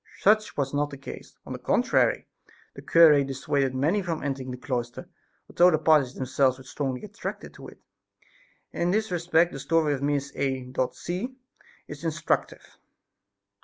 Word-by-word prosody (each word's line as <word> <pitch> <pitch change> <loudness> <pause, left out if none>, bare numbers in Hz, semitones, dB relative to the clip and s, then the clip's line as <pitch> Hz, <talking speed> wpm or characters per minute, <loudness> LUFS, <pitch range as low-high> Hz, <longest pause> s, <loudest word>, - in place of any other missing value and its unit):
Such 215 +1 +3
was 140 -1 -1
not 145 0 0
the 140 - -9
case; 135 - -10
on - - -6
the - - -6
contrary - - +1 0.5
the - - -10
cure 155 -4 +6
dissuaded 135 0 -1
many 160 +10 +1
from 170 -4 -4
entering 135 -2 -3
the 125 - -5
cloister, 125 -1 -4 0.4
although 175 +1 +5
the 160 - +2
parties 150 -5 +3
themselves 130 0 +1
felt 130 - -14
strongly 135 -1 -4
attracted 210 +1 -7
to - - -11
it. - - -14 0.9
In 170 - -1
this 215 +2 0
respect 175 0 +2
the 135 - -7
story 160 0 +1
of 135 - -4
Miss 140 -1 -1
A. 130 -2 -2 0.2
C. 200 +10 -5 0.5
is - - -9
instructive. - - -2
145 Hz, 160 wpm, -26 LUFS, 135-170 Hz, 0.9 s, cure